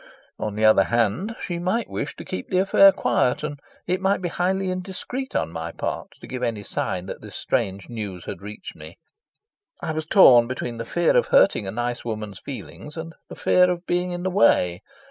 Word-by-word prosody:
On 105 -1 -3
the 110 +1 +2
other 110 -3 +6
hand, 120 - 0
she 175 -1 -4
might 185 +6 0
wish - - -4
to - - -9
keep 185 - -5
the 185 - +1
affair 195 +1 +7
quiet, 125 -9 +1
and 145 -2 -4 0.3
it 185 +2 -1
might 195 +1 +2
be 180 -1 -2
highly 185 +2 0
indiscreet 190 +8 -5
on 80 - 0
my 80 0 -5
part - - -4
to - - -9
give 130 -1 -6
any 115 -4 -2
sign 90 -2 -3
that - - -7
this - - -11
strange 95 0 -2
news 105 -7 -6
had - - -6
reached 105 +1 -9
me. 80 +1 -12 0.8
I - - -3
was 155 0 -4
torn 125 - +7
between 120 -2 -4
the 115 0 -6
fear 175 - +2
of - - +4
hurting - - +4
a - - -3
nice 120 +2 -3
woman's 105 -4 -5
feelings 145 +3 -9
and 165 0 -6 0.2
the - - -8
fear 180 0 +4
of 180 0 -3
being 180 +1 0
in 175 0 -4
the 185 - -1
way. 90 - +3
145 Hz, 205 wpm, -24 LUFS, -, 0.8 s, affair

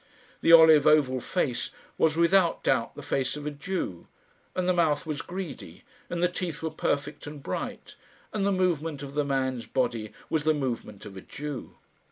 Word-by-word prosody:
The - - +4
olive 160 -3 +8
oval 145 -4 +4
face 130 -8 -1 0.3
was 160 0 +2
without 170 +1 +3
doubt 120 -4 +1
the - - -8
face 135 +2 -1
of 150 - -7
a 150 - -2
Jew, 145 - -4 0.5
and 185 -1 0
the 185 - +4
mouth 160 -4 +2
was 155 -2 -3
greedy, 175 - -7 0.3
and 175 0 -2
the - - +6
teeth 175 -3 -4
were 160 - -1
perfect 145 -1 -2
and 145 -1 -8
bright, - - -5 0.4
and 210 -2 0
the 200 - +2
movement 165 -6 0
of 140 0 -7
the 150 0 +1
man's 130 -3 -1
body 115 -4 -1 0.2
was 155 -2 0
the 155 0 +3
movement 120 -7 -4
of 95 - -9
a - - -7
Jew. 145 +1 -7
150 Hz, 185 wpm, -27 LUFS, 135-170 Hz, 0.5 s, olive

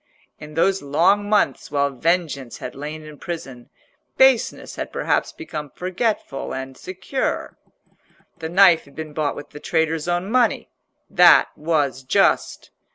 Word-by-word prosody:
In 150 0 -11
those 190 +4 +2
long 175 +9 +2
months 205 -10 +1
while 140 -1 +1
vengeance 150 -3 -1
had 125 - -7
lain 150 +2 -7
in 150 -1 -12
prison, 135 -8 -7 0.5
baseness 265 -3 +3
had - - -5
perhaps - - 0
become 165 - -7
forgetful 185 - -3
and 130 0 -6
secure. 185 - -4 0.8
The 160 -1 -5
knife 175 -2 +5
had 140 - -19
been 155 -1 -7
bought 150 -2 -1
with 145 - -10
the 150 - -10
traitor's 160 0 -1
own 175 +3 -1
money. 250 0 +2 0.4
That - - +6
was 150 -4 0
just. 130 - +1
160 Hz, 140 wpm, -22 LUFS, 145-185 Hz, 0.8 s, That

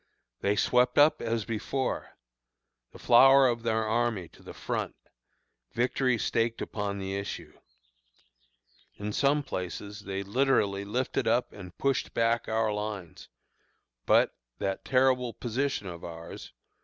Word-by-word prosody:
They 100 +1 +1
swept 125 +3 +2
up 145 +2 +5
as 115 -2 -1
before: 125 +4 -3 0.7
the - - -13
flower 135 +2 +7
of 120 -1 -1
their 110 -1 0
army 110 -5 0
to - - -19
the - - -10
front, - - -4 0.8
victory 125 +1 +1
staked 115 +1 0
upon 100 -1 -3
the 95 0 -4
issue. 100 0 -6 1.4
In 105 +1 -5
some 145 +4 +2
places 100 -2 -5
they 100 -1 -4
literally 100 -3 +1
lifted 125 +6 -1
up 120 +2 +1
and 90 -3 -11
pushed 135 -1 -1
back 115 0 +1
our 110 -1 +1
lines; 105 -4 -6 0.8
but, - - +4 0.2
that 95 0 -3
terrible 130 -2 +2
position 130 0 -2
of 85 -2 -8
ours! 85 -1 -9
115 Hz, 130 wpm, -29 LUFS, 100-125 Hz, 1.4 s, flower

